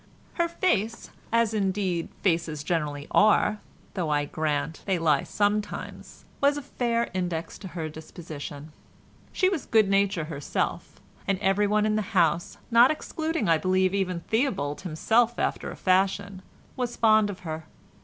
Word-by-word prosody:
Her 340 -1 +1
face 230 - -1 0.2
(as 230 -1 +2
indeed 190 -4 -1
faces 165 -5 0
generally 150 -3 -2
are, 210 0 +4 0.3
though 175 -5 -2
I 145 -1 +1
grant 155 +1 -2
they 190 -2 +2
lie 155 -4 +3
sometimes) 210 0 -3 0.2
was 285 +1 +3
a 290 - -5
fair 235 -2 -1
index 175 -3 -3
to 195 - -8
her 165 -3 -4
disposition. 155 -1 -9 0.6
She 370 - +2
was 370 -7 -2
good 220 -3 +4
nature 195 -3 +2
itself, 140 - -3 0.3
and 195 - +1
everyone 205 +2 +2
in 215 0 +1
the - - +1 0.2
house, 170 0 +2
not 235 +2 +7
excluding 315 -4 -2
I 165 -1 +4
believe 185 +2 +2
even 185 -3 -1
Theobald 190 - -1
himself 225 +8 +1
after - - -1
a - - -7
fashion, 190 +1 +1 0.3
was 245 -2 -3
fond 215 -2 +4
of 190 -2 -7
her. 160 -2 -5
190 Hz, 145 wpm, -26 LUFS, 165-220 Hz, 0.6 s, not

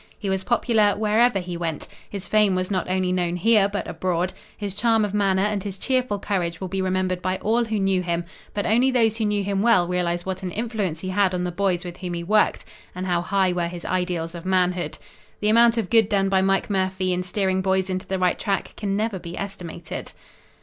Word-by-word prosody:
He 200 -2 -3
was 190 0 -1
popular 220 -2 +2
wherever 220 +1 +3
he 180 -2 -4
went. 165 -3 -3 0.2
His 195 -3 -6
fame 210 -3 +3
was 185 +1 -2
not 185 -2 -1
only 185 0 +1
known 175 -1 0
here, 205 +2 +4
but 205 -1 -3
abroad. 175 +1 -1 0.2
His 205 -3 -4
charm 225 +1 +2
of 205 - -5
manner 195 -2 +2
and 210 -1 0
his 195 0 -6
cheerful 255 -3 0
courage 175 -4 -2
will 190 - -4
be 195 +1 -2
remembered 185 -1 0
by 185 +1 -1
all 230 +4 +1
who 220 -1 -2
knew 195 -1 +2
him, 170 -1 -2 0.3
but 205 - -1
only 240 +4 +3
those 225 -4 +2
who 225 - 0
knew 205 -1 0
him 195 0 -1
well 220 -6 +4
realize 175 -1 -1
what 190 0 -3
an 185 - -3
influence 210 -8 -2
he 185 - -4
had 185 -1 +2
on 180 - -1
the 180 - -2
boys 185 -1 0
with 175 -1 -7
whom 180 -2 -4
he 170 - -4
worked, 210 +4 +2 0.3
and 185 +1 -4
how 175 -2 +1
high 190 0 +1
were 175 -1 0
his 175 0 -8
ideals 180 -2 -1
of 170 -1 -8
manhood. 180 -1 0 0.4
The 210 - +1
amount 235 +1 +5
of 215 -6 -2
good 225 -3 +5
done 195 -2 +2
by 190 -1 +3
Mike 195 0 +1
Murphy 190 -1 0
in 180 - -1
steering 190 +1 0
boys 190 0 +1
into 185 -1 -3
the 190 - -1
right 180 -1 +1
track 195 -2 -2
can 200 -1 -2
never 215 -2 -1
be 170 0 -8
estimated." 195 -4 -6
190 Hz, 225 wpm, -23 LUFS, 180-210 Hz, 0.4 s, amount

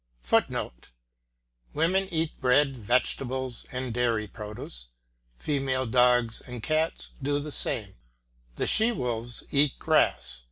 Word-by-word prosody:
[Footnote: - - 0 0.9
Women 185 +5 +2
eat 165 -4 -2
bread, 135 +2 +3
vegetables, 125 +2 -1
and 125 -2 -3
dairy 115 -3 +1
produce; 105 - -6 0.5
female 135 - -1
dogs 125 -1 +3
and 125 -3 -8
cats 155 +1 -1
do 145 +1 0
the 150 +1 -6
same; 105 -8 -2 0.6
the - - -1
she 220 +2 +4
wolves 120 - -2
eat 140 0 +3
grass. - - +2
125 Hz, 115 wpm, -27 LUFS, 115-145 Hz, 0.9 s, she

